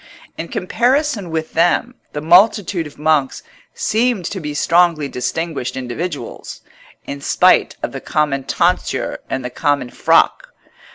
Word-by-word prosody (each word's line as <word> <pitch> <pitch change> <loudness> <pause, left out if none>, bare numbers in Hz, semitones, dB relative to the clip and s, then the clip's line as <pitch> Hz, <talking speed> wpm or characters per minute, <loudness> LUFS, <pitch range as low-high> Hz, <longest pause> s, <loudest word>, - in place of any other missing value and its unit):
In 165 - -5
comparison 240 - 0
with 160 -1 -3
them, 175 +9 +2 0.2
the 150 - -4
multitude 180 0 +3
of 145 - -15
monks 150 -3 +1 0.3
seemed 240 - 0
to 195 - -4
be 150 -3 -5
strongly 170 -2 +3
distinguished 135 0 -3
individuals, 130 +2 -6 0.4
in 140 0 -6
spite - - +3
of - - -2
the - - -7
common 140 -3 -1
tonsure - - 0
and 130 -1 -3
the 125 - -4
common 140 -2 -1
frock. - - +2
160 Hz, 130 wpm, -18 LUFS, 140-185 Hz, 0.4 s, multitude